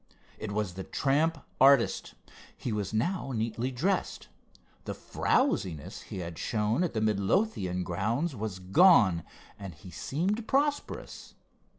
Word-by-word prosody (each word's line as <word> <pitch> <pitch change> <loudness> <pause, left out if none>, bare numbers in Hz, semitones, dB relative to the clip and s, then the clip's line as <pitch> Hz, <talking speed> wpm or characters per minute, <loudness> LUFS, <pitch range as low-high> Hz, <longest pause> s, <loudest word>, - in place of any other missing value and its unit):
It 105 -1 -5
was 100 -3 -2
the 95 +1 -6
tramp 145 - 0 0.2
artist. 135 -3 +4 0.4
He 125 - -4
was 105 -3 -2
now 135 - -1
neatly 115 +3 -1
dressed. 175 +10 -1 0.6
The - - -4
frowsiness 80 -7 0
he - - -5
had 85 -2 -6
shown 110 +7 0
at 175 - -1
the 110 - 0
Midlothian 100 - +1
grounds 115 - -1
was 105 -3 -4
gone, 95 - +5 0.4
and 95 -5 -7
he 90 +3 -12
seemed 195 - -2
prosperous. 290 +2 -1
110 Hz, 125 wpm, -29 LUFS, -, 0.6 s, gone